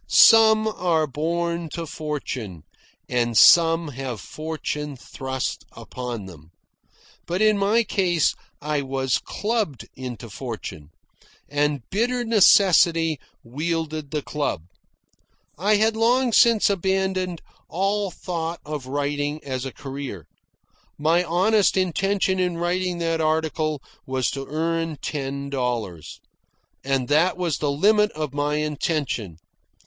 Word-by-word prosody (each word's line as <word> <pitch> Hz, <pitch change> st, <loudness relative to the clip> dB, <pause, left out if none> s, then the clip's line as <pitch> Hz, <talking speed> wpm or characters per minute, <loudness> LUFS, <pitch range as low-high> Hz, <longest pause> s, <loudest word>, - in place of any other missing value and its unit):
Some 220 Hz, -1 st, +7 dB
are 175 Hz, -7 st, +1 dB
born 170 Hz, +3 st, -2 dB
to 170 Hz, -1 st, -4 dB
fortune, 130 Hz, -, -5 dB, 0.4 s
and 120 Hz, -2 st, 0 dB
some 165 Hz, -1 st, +6 dB
have 130 Hz, -4 st, -5 dB
fortune 150 Hz, -, -5 dB
thrust 130 Hz, +1 st, -5 dB
upon 120 Hz, -5 st, -6 dB
them. 80 Hz, -4 st, -13 dB, 0.8 s
But 175 Hz, +2 st, -1 dB
in 215 Hz, 0 st, +4 dB
my 205 Hz, +4 st, +2 dB
case 180 Hz, -7 st, +1 dB, 0.3 s
I 150 Hz, -1 st, 0 dB
was 135 Hz, -1 st, -1 dB
clubbed 210 Hz, -, -3 dB
into 125 Hz, -2 st, -7 dB
fortune, 105 Hz, -, -7 dB, 0.6 s
and 145 Hz, -3 st, -1 dB
bitter 240 Hz, +4 st, 0 dB
necessity 175 Hz, -, +5 dB, 0.2 s
wielded 155 Hz, +3 st, -3 dB
the 150 Hz, -1 st, -3 dB
club. 145 Hz, -, -2 dB, 0.9 s
I 205 Hz, +7 st, +2 dB
had 220 Hz, +2 st, +2 dB
long 240 Hz, +2 st, +2 dB
since 230 Hz, -2 st, +5 dB
abandoned 190 Hz, -2 st, -1 dB, 0.3 s
all 195 Hz, +4 st, 0 dB
thought 170 Hz, -2 st, -4 dB
of 150 Hz, -3 st, -5 dB
writing 145 Hz, +2 st, -2 dB
as 130 Hz, -1 st, -4 dB
a 135 Hz, -, -4 dB
career. 135 Hz, -, -7 dB, 0.7 s
My 165 Hz, +4 st, +2 dB
honest 190 Hz, +5 st, +2 dB
intention 190 Hz, +1 st, +1 dB
in 180 Hz, -2 st, 0 dB
writing 180 Hz, +1 st, -1 dB
that 165 Hz, -1 st, -1 dB
article 155 Hz, -2 st, 0 dB, 0.2 s
was 130 Hz, -2 st, 0 dB
to 135 Hz, -1 st, -6 dB
earn 165 Hz, +1 st, -2 dB
ten 140 Hz, -1 st, -4 dB
dollars. 120 Hz, -, -3 dB, 0.6 s
And 135 Hz, -2 st, 0 dB
that 165 Hz, +5 st, +3 dB
was 175 Hz, -5 st, -1 dB
the 150 Hz, -, 0 dB
limit 210 Hz, +8 st, +3 dB
of 155 Hz, -3 st, -4 dB
my 145 Hz, +1 st, 0 dB
intention. 150 Hz, -, -2 dB
155 Hz, 120 wpm, -23 LUFS, 135-185 Hz, 0.9 s, Some